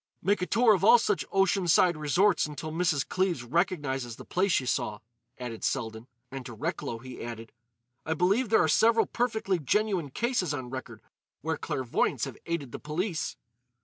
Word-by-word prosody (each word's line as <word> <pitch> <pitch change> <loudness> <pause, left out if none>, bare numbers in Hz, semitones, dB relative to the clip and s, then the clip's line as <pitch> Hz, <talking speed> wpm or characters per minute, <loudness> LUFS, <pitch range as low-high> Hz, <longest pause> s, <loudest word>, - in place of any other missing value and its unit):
"Make 200 +2 +2
a 180 - -1
tour 230 -1 +5
of 190 - 0
all 230 +4 +8
such 210 -4 0
ocean 195 -1 +2
side 175 +1 +5
resorts 165 +5 +2
until 150 +1 -6
Mrs. 160 -4 0
Cleves 180 -8 0
recognises 135 -4 -1
the - - -11
place 190 +2 +1
she 135 - +2
saw," 105 -3 -1 0.4
added 120 -3 -6
Selden. 110 -2 -2 0.2
And 135 -1 -6
to 120 - -8
Recklow 115 +2 -3
he 130 +1 -9
added: 115 -1 -7 0.5
"I 160 - -1
believe 200 +8 +2
there 220 - +5
are - - +2
several 225 +8 +4
perfectly 220 -6 -1
genuine 185 - 0
cases 210 - -1
on 125 -3 -6
record 125 -4 -7 0.4
where - - -1
clairvoyants 130 -3 -1
have - - -9
aided 160 -7 -3
the - - -6
police." 160 +2 -3
165 Hz, 175 wpm, -28 LUFS, 130-195 Hz, 0.5 s, all